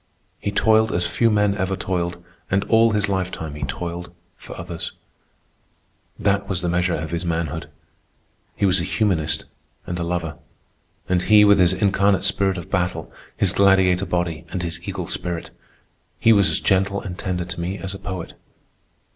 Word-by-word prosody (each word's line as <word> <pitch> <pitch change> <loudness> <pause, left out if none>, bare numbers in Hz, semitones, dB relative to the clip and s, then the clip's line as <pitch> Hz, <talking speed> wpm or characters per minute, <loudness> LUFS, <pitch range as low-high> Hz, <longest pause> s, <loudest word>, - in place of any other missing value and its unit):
He - - -2
toiled 110 +1 +3
as 90 0 +1
few 115 +5 +2
men 105 -2 +3
ever 95 -1 -1
toiled, 90 -2 -2 0.3
and 100 +1 +2
all 115 +2 +4
his 105 -1 +1
lifetime 95 -5 -3
he 75 - -8
toiled 85 +5 -4 0.2
for - - -11
others. - - -5 1.2
That 100 -1 0
was 95 -2 -1
the 90 - -1
measure 90 0 +1
of 80 0 -4
his 85 +1 -2
manhood. 80 -3 -2 0.9
He - - +1
was 95 -2 +3
a - - -2
humanist 85 -6 0 0.4
and 90 0 -4
a - - -1
lover. 85 -2 -3 0.7
And 90 -1 +2
he, 105 +2 +6
with 100 -1 +6
his 90 0 +5
incarnate 100 0 +2
spirit 100 -1 +1
of 85 - -8
battle, 90 0 -1 0.2
his - - +2
gladiator 95 -1 +4
body 85 -3 -1
and 90 - -3
his 85 0 -4
eagle - - -3
spirit—he 90 +5 -2
was 100 -5 +4
as 80 - +1
gentle 100 +1 +2
and 90 -3 -6
tender 90 -2 -3
to 85 - -6
me 90 +3 -3
as 95 0 -5
a 100 - -8
poet. 90 -3 -6
90 Hz, 170 wpm, -22 LUFS, 85-100 Hz, 1.2 s, he